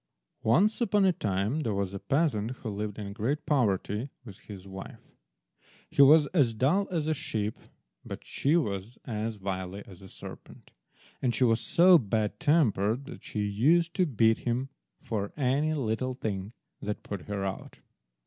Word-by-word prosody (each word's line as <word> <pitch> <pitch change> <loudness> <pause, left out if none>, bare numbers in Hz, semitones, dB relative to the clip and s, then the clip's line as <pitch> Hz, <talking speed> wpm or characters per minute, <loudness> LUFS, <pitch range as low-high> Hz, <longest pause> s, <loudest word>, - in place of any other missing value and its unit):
ONCE 195 - +3
upon 210 -4 +3
a 185 - +4
time 105 - -1
there 115 -9 -1
was 100 -1 -2
a 100 - -4
peasant 115 - 0
who 125 -2 -6
lived 105 0 -4
in 100 -2 -6
great 135 +8 -2
poverty 115 - 0 0.2
with 100 -4 -11
his 100 -2 -11
wife. 95 0 -10 0.8
He - - +4
was 150 +2 +8
as 130 -10 +3
dull 160 - +2
as 165 -4 -1
a 155 - +2
sheep, 110 -8 -3 0.4
but - - -8
she 150 +5 +1
was 105 - -3
as 110 -2 -3
wily 95 0 -4
as 95 -2 -14
a 95 - -12
serpent, - - -11 0.5
and 120 -3 +1
she 130 - +2
was 115 -2 +3
so 175 0 +6
bad 110 -2 -1
tempered 135 - +2
that - - -10
she 105 - -4
used 160 +12 +2
to 185 -1 +2
beat 115 -4 +3
him 125 +3 -2 0.3
for 105 -3 -3
any 145 +3 +1
little 130 -1 -1
thing 105 -3 -4 0.3
that 105 0 -4
put 100 -4 -6
her 100 -1 -2
out. 95 0 -6
115 Hz, 170 wpm, -29 LUFS, 100-150 Hz, 0.8 s, was